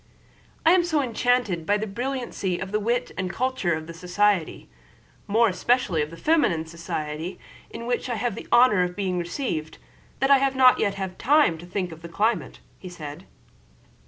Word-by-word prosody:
"I 325 - +7
am 365 -1 +5
so 325 -3 +1
enchanted 245 -7 0
by 205 - +3
the 215 - -3
brilliancy 240 -4 -3
of 190 +1 -6
the 210 - +1
wit 240 +4 -1
and 185 -1 -1
culture 240 -7 -1
of 155 0 -6
the 170 - -9
society, 180 +1 0 0.6
more 225 +3 +4
especially 205 -4 +1
of 150 - -2
the 165 - -11
feminine 205 - +2
society, 160 0 -5 0.3
in 235 - -8
which 245 +1 -2
I 240 - -1
have 235 +2 -1
had - - -7
the - - -19
honor 240 -6 +6
of 180 0 -1
being 185 -3 -1
received, 170 - -4 0.4
that 270 +1 +2
I 275 - +7
have 270 0 +1
not 255 -1 +6
yet 200 -2 +1
had 190 -2 -5
time 285 - +3
to 175 - -11
think 180 -1 -3
of 160 0 -11
the 170 - -9
climate," 215 +7 -1 0.3
said 150 -5 -8
he. - - -22
200 Hz, 190 wpm, -25 LUFS, 170-245 Hz, 0.6 s, I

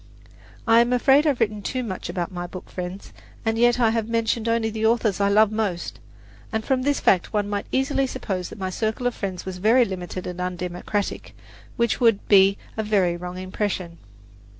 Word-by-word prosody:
I 230 0 +6
am 240 +1 +3
afraid 270 +4 +4
I - - +5
have 275 - -1
written 210 -2 0
too 255 +5 -3
much 190 -6 -5
about 175 +1 -3
my 175 -1 -5
book 185 +1 -10
friends, 180 +1 -6 0.3
and 225 0 +1
yet 240 +1 +3
I 230 -2 +4
have 225 -1 -1
mentioned 230 0 0
only 230 -1 +1
the 220 0 -4
authors 220 -3 +2
I 200 - +3
love 210 +1 +4
most; 210 -6 -3 0.5
and 220 0 -2
from 260 -1 +1
this 285 +2 +1
fact 185 +2 +2
one 205 -1 0
might 205 0 -3
easily 270 0 +1
suppose 190 -8 -4
that - - -10
my 190 -2 -3
circle 220 +5 -2
of 245 - +1
friends 190 -5 -5
was 185 -1 -6
very 230 +6 +5
limited 185 -2 -6
and 180 0 -5
undemocratic, 180 +3 -3 0.4
which 235 -1 +1
would 225 -4 +3
be 195 0 +6 0.2
a - - +1
very 200 -5 +1
wrong 180 +1 -7
impression. 185 -2 -3
210 Hz, 195 wpm, -23 LUFS, 185-230 Hz, 0.5 s, I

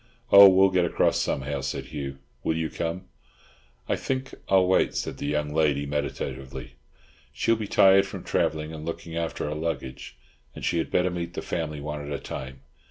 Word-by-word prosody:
"Oh, 100 0 +11
we'll 95 0 +5
get 90 -1 +3
across 85 - +2
somehow," 70 +1 -2
said 65 +1 -3
Hugh, 70 -3 -6 0.3
"will 80 - 0
you 80 -2 -2
come?" 85 +3 -3 0.8
"I - - +1
think 130 0 -3 0.2
I'll 95 -1 +5
wait," 95 +1 +2
said - - -3
the - - -3
young 75 0 -1
lady 75 -2 +2
meditatively, 70 -2 -4 0.6
"She'll 95 +11 +1
be 110 -2 -4
tired 95 0 +5
from - - -8
travelling 80 0 -1
and 75 -1 -7
looking 85 0 -6
after 85 -1 -2
her 75 - -2
luggage, 75 -6 -5 0.4
and - - -6
she 85 - +1
had 80 - -2
better 90 0 +1
meet 85 -1 -5
the - - -4
family 75 -3 -3
one 75 0 -5
at 70 - -7
a 70 - -1
time. 65 0 -7
80 Hz, 185 wpm, -26 LUFS, 70-90 Hz, 0.8 s, Oh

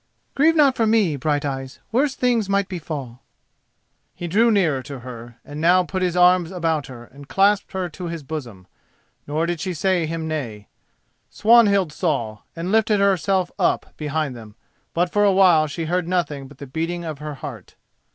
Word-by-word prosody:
"Grieve 320 +4 +4
not 285 -4 +4
for 225 - +1
me, 215 -8 +3
Brighteyes, 140 -2 -2
worse 265 +4 +1
things 235 -5 +1
might 200 -1 +1
befall." 150 -9 -6 0.9
He 175 - -5
drew 220 +7 +3
nearer 170 -11 +2
to 135 -1 -9
her, 120 -1 -10
and 145 +1 -7
now 180 +2 +5
he - - -12
put 185 +4 -2
his 180 -1 0
arms 180 -1 +5
about 165 -5 -1
her 120 -2 -10
and 140 +4 -15
clasped 200 +1 +2
her 190 -1 -2
to 175 +2 -7
his 165 -2 -5
bosom; 125 -11 -7 0.6
nor 155 +3 0
did 170 -1 -2
she 180 +2 -3
say 180 0 +1
him 165 0 -4
nay. 120 -10 -5 0.6
Swanhild 205 -7 +4
saw 120 - -2 0.2
and 170 +3 -4
lifted 220 -1 +3
herself 190 -2 +1
up - - 0
behind 150 -3 -2
them, 110 -3 -12 0.4
but 175 +1 +1
for 205 - +3
a 200 - +5
while 180 -5 +5
she 160 +3 -4
heard 175 +1 -1
nothing 160 -7 -2
but 140 0 -16
the 140 - -8
beating 165 +5 -3
of 155 -3 -5
her 150 -1 -6
heart. 130 - -9
165 Hz, 180 wpm, -22 LUFS, 145-190 Hz, 0.9 s, now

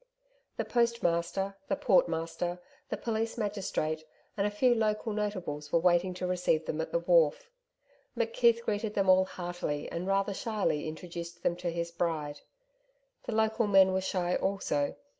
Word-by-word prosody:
The - - -1
postmaster, 195 -5 0
the - - +1
portmaster, 175 - +1 0.3
the - - -2
police 225 0 -2
magistrate, 190 -7 -2 0.3
and 200 0 +1
a - - 0
few 240 +4 +3
local 220 -1 0
notables 185 -9 -3
were - - +4
waiting 180 +1 +3
to 180 - -3
receive 180 -3 +1
them 160 - -2
at 160 - -5
the - - +2
wharf. 170 - +3 0.7
McKeith 235 0 +3
greeted 215 -1 -2
them 195 -2 +2
all 185 0 +5
heartily 175 -5 -4
and 175 +2 -3
rather 195 +1 +1
shyly 200 -8 -1
introduced 170 +1 -7
them 170 - +2
to 175 0 -2
his 170 0 -3
bride. 155 -4 -2 0.9
The 225 - -2
local 220 0 +2
men 190 -2 +6
were 190 - +1
shy 180 -2 -1
also. 190 -7 0
185 Hz, 155 wpm, -30 LUFS, 170-210 Hz, 0.9 s, men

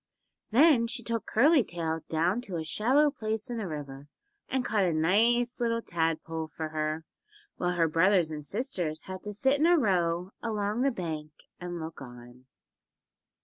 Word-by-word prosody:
Then 255 -1 +5
she 240 +1 -3
took 230 -2 -3
Curly 280 +4 +5
Tail 165 -3 -3
down 175 +8 +1
to 185 - -6
a 160 - -2
shallow 255 - +3
place 220 -2 -3
in 235 - -3
the 210 - -3
river 145 -3 -7 0.4
and 260 -1 -1
caught 210 -3 +1
a 175 -3 +1
nice 230 +10 +2
little 230 -1 +1
tadpole 165 -1 -2
for 155 0 -6
her, 155 +1 -2 0.5
while 180 0 0
her 170 -2 +2
brothers 165 +1 +3
and 150 -1 -5
sisters 175 - -2
had 185 0 -7
to 210 - -6
sit 265 +7 +2
in 315 - +4
a 350 0 +5
row 180 - +1
along 215 0 -1
the 275 - +3
bank 160 - -5 0.3
and 175 -1 -5
look 160 -1 -7
on. 120 0 -12
185 Hz, 170 wpm, -29 LUFS, 160-230 Hz, 0.5 s, Then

